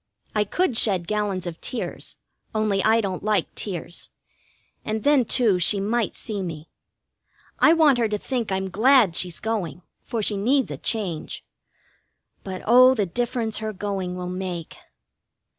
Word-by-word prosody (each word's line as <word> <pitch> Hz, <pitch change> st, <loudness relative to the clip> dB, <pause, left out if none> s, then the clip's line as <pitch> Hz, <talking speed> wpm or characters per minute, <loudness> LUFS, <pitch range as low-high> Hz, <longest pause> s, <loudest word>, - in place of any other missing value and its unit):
I 210 Hz, -1 st, +1 dB
could 270 Hz, -, 0 dB
shed 185 Hz, -5 st, +2 dB
gallons 205 Hz, -3 st, -1 dB
of 170 Hz, -2 st, -7 dB
tears, 250 Hz, -, -4 dB, 0.4 s
only 215 Hz, -3 st, +1 dB
I 225 Hz, +1 st, +4 dB
don't 190 Hz, -3 st, -3 dB
like 210 Hz, -1 st, 0 dB
tears, 175 Hz, -3 st, -6 dB, 0.7 s
and 215 Hz, 0 st, -3 dB
then, 285 Hz, -4 st, +4 dB
too, 220 Hz, -6 st, +2 dB
she 195 Hz, +3 st, +3 dB
might 220 Hz, +3 st, -1 dB
see 210 Hz, -4 st, -5 dB
me. 165 Hz, -3 st, -7 dB, 0.9 s
I 320 Hz, -, +6 dB
want 305 Hz, -6 st, +4 dB
her 230 Hz, -2 st, +1 dB
to 210 Hz, -, -1 dB
think 235 Hz, -1 st, -3 dB
I'm 190 Hz, 0 st, -2 dB
glad 230 Hz, -3 st, +4 dB
she's 180 Hz, -2 st, -1 dB
going, 185 Hz, -8 st, -3 dB, 0.2 s
for 225 Hz, -2 st, -3 dB
she 205 Hz, 0 st, +1 dB
needs 260 Hz, +7 st, +1 dB
a -, -, -5 dB
change. 190 Hz, -9 st, -3 dB, 1.0 s
But, 185 Hz, -1 st, -6 dB
oh, 255 Hz, +3 st, +7 dB
the 210 Hz, -4 st, +1 dB
difference 230 Hz, +3 st, -2 dB
her 220 Hz, 0 st, -4 dB
going 190 Hz, -2 st, -3 dB
will 180 Hz, 0 st, -5 dB
make! 180 Hz, -2 st, -5 dB
210 Hz, 155 wpm, -24 LUFS, 185-230 Hz, 1.0 s, oh